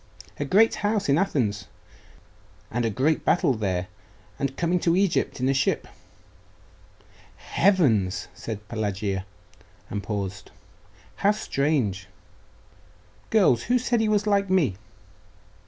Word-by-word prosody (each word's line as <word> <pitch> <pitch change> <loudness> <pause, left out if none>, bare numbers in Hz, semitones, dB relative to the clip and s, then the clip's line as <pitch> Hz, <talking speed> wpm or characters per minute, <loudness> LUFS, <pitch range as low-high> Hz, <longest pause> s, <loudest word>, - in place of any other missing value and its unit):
'A 145 - -1
great 215 +10 +4
house 205 -1 0
in 140 +3 +4
Athens 115 - -1 1.0
and 120 0 -1
a - - +1
great 135 +8 +1
battle 170 -5 +3
there 95 -5 -2 0.5
and 140 -1 -2
coming 175 +1 +1
to 170 0 +2
Egypt 190 -6 +1
in 130 - 0
a 135 - +3
ship.' 135 - 0 1.5
'Heavens!' 125 - +2
said 105 +2 -7
Pelagia, 100 -3 -3 0.6
and 105 - -2
paused.... 100 -3 -5 0.7
'How 200 - +2
strange! 140 - 0 1.2
Girls, 185 - +3
who 250 - +3
said 240 -1 0
he 220 - +1
was 210 -1 +2
like 200 -2 +1
me? 165 - +2
135 Hz, 120 wpm, -25 LUFS, -, 1.5 s, great